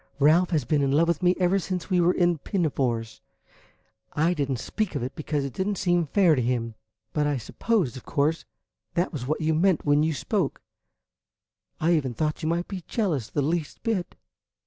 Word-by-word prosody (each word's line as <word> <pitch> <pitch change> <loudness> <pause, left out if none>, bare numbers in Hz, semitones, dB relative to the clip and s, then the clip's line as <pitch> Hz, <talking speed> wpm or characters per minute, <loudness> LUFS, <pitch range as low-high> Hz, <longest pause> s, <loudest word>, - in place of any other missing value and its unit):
"Ralph 155 +5 +4
has 155 -7 0
been 150 +1 +1
in 135 -1 +1
love 160 +4 +3
with 170 -1 0
me 180 0 +3
ever 185 +2 +3
since 185 0 -4
we 180 -1 +4
were 175 +1 +4
in 175 -3 +2
pinafores. 130 - -1 0.9
I 160 +4 +2
did 145 -5 -2
n't 130 - 0
speak 210 - -3
of - - -1
it 130 - -4
because 150 -2 -2
it 135 - -5
did 190 - -2
n't 205 -2 -1
seem 175 -3 +1
fair 180 +1 +4
to 130 - +1
him; 115 -1 -1 0.4
but 150 -1 +1
I 145 -2 0
supposed, 145 - -1
of 125 - -10
course, 150 +3 0 0.5
that 175 +2 0
was 130 -4 -4
what 155 +2 -1
you 160 +1 +2
meant 175 +1 +2
when 145 0 +4
you 155 0 +1
spoke. 185 -2 -2 1.2
I 165 +2 +3
even 135 -7 0
thought 155 +4 -1
you 155 - -1
might 170 +1 -1
be 190 -2 -5
jealous 165 - -1
the 145 - -1
least 155 +1 -2
bit." 210 -6 -2
155 Hz, 205 wpm, -26 LUFS, 140-180 Hz, 1.2 s, Ralph